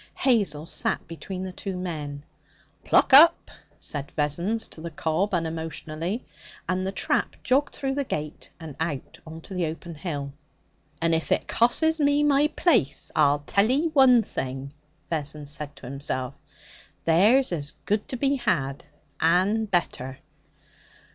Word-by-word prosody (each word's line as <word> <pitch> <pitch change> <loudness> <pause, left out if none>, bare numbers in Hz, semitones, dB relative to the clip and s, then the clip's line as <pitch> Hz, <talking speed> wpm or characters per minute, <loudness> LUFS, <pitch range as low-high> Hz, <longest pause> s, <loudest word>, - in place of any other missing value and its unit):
Hazel 200 - +1
sat - - -1
between 185 +3 -6
the 190 - -5
two 190 +1 -5
men. 150 -6 -5 0.6
'Pluck - - +3
up!' 315 +5 +7 0.3
said 145 -1 -5
Vessons 170 +10 0
to 160 - -10
the 170 - -5
cob 160 +5 -1
unemotionally, 165 +3 -3 0.4
and 185 +1 -1
the - - -1
trap - - 0
jogged 275 +3 +1
through 270 -1 -2
the 280 +1 -1
gate 155 - -5
and 160 -4 -8
out 160 -5 -4
on 160 +1 -9
to 190 - -10
the 180 -3 0
open 165 +2 -7
hill. 145 -4 -5 0.7
'And 165 0 +1
if 160 0 -1
it - - +1
cosses 315 +8 +2
me 290 0 +3
my 290 0 +4
place, 245 - +1
I'll 145 -1 +3
tell 200 +7 +2
ye 295 +6 +2
one 265 -6 +6
thing!' 135 -5 -5 0.4
Vessons 150 -2 -3
said 145 -1 -7
to - - -13
himself: 135 0 -3 0.7
'There's 210 +11 +4
as 150 0 -4
good 210 +1 0
to 255 - -4
be 275 +2 +1
had, 140 - -1 0.4
and 195 +6 +2
better.' 135 -7 -1
170 Hz, 150 wpm, -25 LUFS, 150-230 Hz, 0.7 s, up